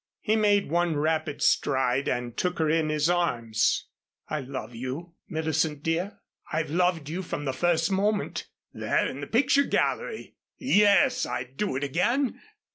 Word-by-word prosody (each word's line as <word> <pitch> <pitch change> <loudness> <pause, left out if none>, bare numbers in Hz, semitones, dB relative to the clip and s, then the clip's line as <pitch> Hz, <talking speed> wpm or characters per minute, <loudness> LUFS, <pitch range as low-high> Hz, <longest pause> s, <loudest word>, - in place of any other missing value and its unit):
He 215 - +1
made 205 -5 +2
one 170 -1 +1
rapid 155 -1 -1
stride 130 -1 +2
and 120 -1 -2
took 180 0 -1
her 160 - +1
in 155 0 +2
his 155 0 +1
arms. 120 -12 +1 0.4
"I 155 - -2
love 130 -3 -6
you, 130 +9 -6 0.2
Millicent, 160 -3 -1
dear. 170 +5 -1 0.3
I've 155 -1 -1
loved 175 -3 +1
you 170 +5 -3
from 145 -4 -5
the 135 - -1
first 165 +4 +1
moment 205 +2 0 0.3
there - - 0
in 135 - -5
the 140 - -5
picture 280 +4 +3
gallery. 440 - -2 0.2
Yes, 255 +2 +4
I'd 125 +2 -5
do 200 -4 -1
it 135 - -2
again. 235 - 0
160 Hz, 155 wpm, -27 LUFS, 140-195 Hz, 0.4 s, Yes